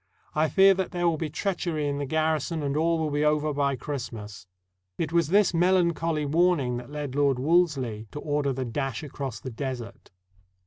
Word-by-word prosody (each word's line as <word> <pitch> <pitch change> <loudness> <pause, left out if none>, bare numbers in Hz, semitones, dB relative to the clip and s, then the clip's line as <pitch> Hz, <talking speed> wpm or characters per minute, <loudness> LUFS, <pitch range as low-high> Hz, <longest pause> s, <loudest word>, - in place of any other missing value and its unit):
I 155 0 +2
fear 195 0 +6
that 190 -1 -2
there 175 -2 0
will 165 -2 +1
be 160 - -2
treachery 165 -2 -2
in 140 0 -2
the 140 - -3
garrison, 155 +1 0
and 140 0 -1
all 165 +2 +2
will 155 -2 -1
be 145 +1 0
over 150 0 +2
by 140 -1 +1
Christmas." 110 -8 -6 0.5
It 165 -1 -2
was 170 -3 +3
this 200 +2 +3
melancholy 170 -3 +2
warning 150 -5 +2
that 120 +1 -8
led 145 -2 -5
Lord 140 -2 +2
Wolseley 135 -8 +1
to 150 - -6
order 145 -2 0
the 130 0 -3
dash 135 +2 -3
across 135 -4 -5
the 130 - -7
Desert. 120 -2 -6
150 Hz, 185 wpm, -26 LUFS, 135-165 Hz, 0.5 s, fear